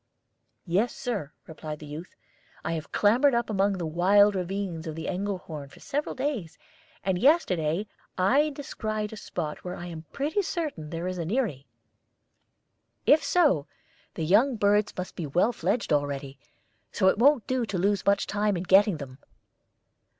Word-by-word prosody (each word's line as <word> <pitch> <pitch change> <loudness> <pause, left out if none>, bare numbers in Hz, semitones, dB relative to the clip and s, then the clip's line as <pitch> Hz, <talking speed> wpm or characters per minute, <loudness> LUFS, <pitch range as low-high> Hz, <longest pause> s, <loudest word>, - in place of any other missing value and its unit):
"Yes, 195 +7 +1
Sir," 205 - -3
replied 155 -1 -7
the 150 - -11
youth. 150 +5 -9 0.5
"I - - -1
have 160 -2 -5
clambered 245 +6 +4
up 235 -1 0
among 200 0 +2
the 180 -3 -3
wild 195 +6 +4
ravines 185 -3 -3
of 155 - -4
the 165 0 -5
Engelhorn 180 -7 -4
for - - -16
several 295 +2 -3
days, 255 - -3 0.5
and 190 -2 0
yesterday 185 - +2 0.3
I 270 +12 +3
descried 215 -7 -4
a - - -6
spot 160 -7 -5
where 180 0 -5
I 175 - -7
am 165 -2 -8
pretty 305 +9 0
certain 305 - -4
there 165 +2 -4
is 185 -1 -3
an 165 -1 -3
eyrie. 200 - -1 1.4
If 300 0 +5
so, 285 - +3 0.5
the 160 - -2
young 230 - +4
birds 205 0 +2
must 180 0 -5
be 165 - -4
well 175 - +2
fledged 225 -5 0
already; 140 -1 -2 0.5
so 190 - +2
it 190 - +3
won't 275 -1 +5
do 255 -3 -1
to 195 - -2
lose 200 +3 +1
much 200 0 +2
time 205 -1 0
in 170 - -3
getting 190 0 +5
them." 135 -2 -9
195 Hz, 165 wpm, -27 LUFS, 165-225 Hz, 1.4 s, If